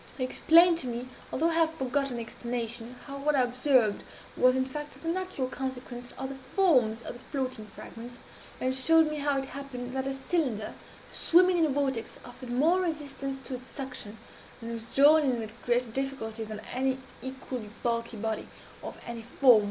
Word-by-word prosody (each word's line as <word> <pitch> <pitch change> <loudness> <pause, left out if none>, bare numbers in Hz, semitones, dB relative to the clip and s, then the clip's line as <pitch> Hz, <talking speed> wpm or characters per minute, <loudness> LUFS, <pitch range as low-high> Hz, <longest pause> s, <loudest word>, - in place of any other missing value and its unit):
He 260 - -1
explained 335 +6 +6
to 260 - -4
me 240 +1 -4 0.2
although 325 +5 +2
I - - -1
have 325 -1 +2
forgotten 270 -1 -1
the 235 - -3
explanation 235 +1 -4
how 275 0 -6
what 295 +1 +2
I 265 - +4
observed 250 -3 +3 0.3
was, 255 0 +5
in 260 0 +2
fact, 295 +2 -6
the - - -5
natural 365 -6 -1
consequence 255 -2 -5
of 265 0 -4
the 275 - -6 0.2
forms 250 - +4
of - - -5
the 245 - -11
floating 255 -6 -3
fragments, 235 +3 -10 0.4
and 255 0 +1
showed 315 +4 +5
me 305 - -3
how 285 -1 +1
it 270 - -1
happened 265 -3 -6
that 265 0 -1
a 270 - -2
cylinder, 270 -7 -1 0.4
swimming 360 +1 +5
in 320 - +4
a - - -2
vortex, 270 -4 -1
offered 245 0 -10
more 315 +10 +3
resistance 285 -5 -3
to 270 - -5
its 255 0 -7
suction, 250 -6 -5 0.4
and 230 -1 -6
was 230 -1 -5
drawn 290 +6 +6
in 260 -4 +1
with 220 -1 -5
greater 240 -1 +2
difficulty, 230 -4 -3
than 215 0 -6
an 265 +1 +1 0.2
equally 260 -4 -6
bulky 230 -1 -1
body, 220 0 -2 0.3
of - - -7
any 235 -1 -5
form 255 +3 +2
whatever. 220 - +6
260 Hz, 190 wpm, -29 LUFS, 240-285 Hz, 0.4 s, explained